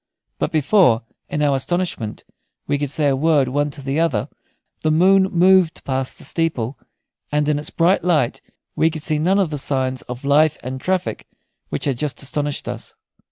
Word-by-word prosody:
But - - -1
before, 155 - +3 0.3
in 150 - -1
our 145 -1 +3
astonishment, 135 -7 -2 0.4
we 145 0 0
could 145 -1 -2
say 145 +2 0
a 135 - +3
word 145 -2 +2
one 145 +2 0
to 140 -1 -8
the 135 +3 -1
other, 145 -11 0 0.5
the 155 - +1
moon 190 +5 +5
moved 180 -1 +3
past 130 -1 -2
the - - -8
steeple, 140 -7 -1 0.6
and 150 0 +1
in 150 -1 +1
its 150 - -4
bright 175 +3 +2
light 155 -9 +1 0.3
we 160 - +3
could 155 -2 -7
see 155 -1 0
none 185 +5 +2
of 190 -6 +1
the 150 - -2
signs 130 -2 -1
of 125 +2 -6
life 150 +2 +4
and 130 +1 -5
traffic 185 +2 -2 0.4
which - - -3
had 135 -4 -1
just 150 -1 -2
astonished 145 +1 -3
us. - - -6
150 Hz, 185 wpm, -20 LUFS, 135-165 Hz, 0.6 s, moon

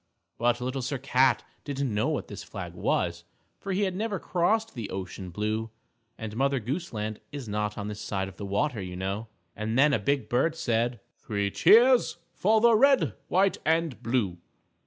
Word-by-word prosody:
But 120 0 +2
Little 130 +2 -2
Sir 135 +3 -2
Cat 130 -1 +3 0.2
didn't 140 -4 -2
know 105 +1 +1
what - - -2
flag - - -7
this - - -11
was, 85 -1 0 0.4
for 195 - -5
he 195 +2 +1
had 190 -2 -1
never 210 0 -1
crossed 215 +7 0
the 115 -5 -5
ocean 95 0 -6
blue, 110 +4 -2 0.5
and 110 -1 -6
Mother 135 +2 +1
Goose 140 +10 -4
Land 105 -1 -4
is 140 -5 -6
not 105 0 -2
on 105 -1 -4
this 105 0 -6
side 95 -1 -2
of 95 -1 -11
the 100 - -5
water, 110 +3 0
you 90 -1 -6
know. 95 +4 -3 0.3
And 110 +3 -2
then 140 +2 +5
a - - +3
big 140 -1 0
bird 145 +7 +1
said, 120 -3 0 0.2
"Three 100 -2 -2
cheers 240 - +5 0.2
for 220 +3 +3
the 235 0 +6
Red, 275 +4 +4
White 190 +2 +2
and 160 -6 +1
Blue!" 115 -7 0
120 Hz, 185 wpm, -28 LUFS, 105-160 Hz, 0.5 s, the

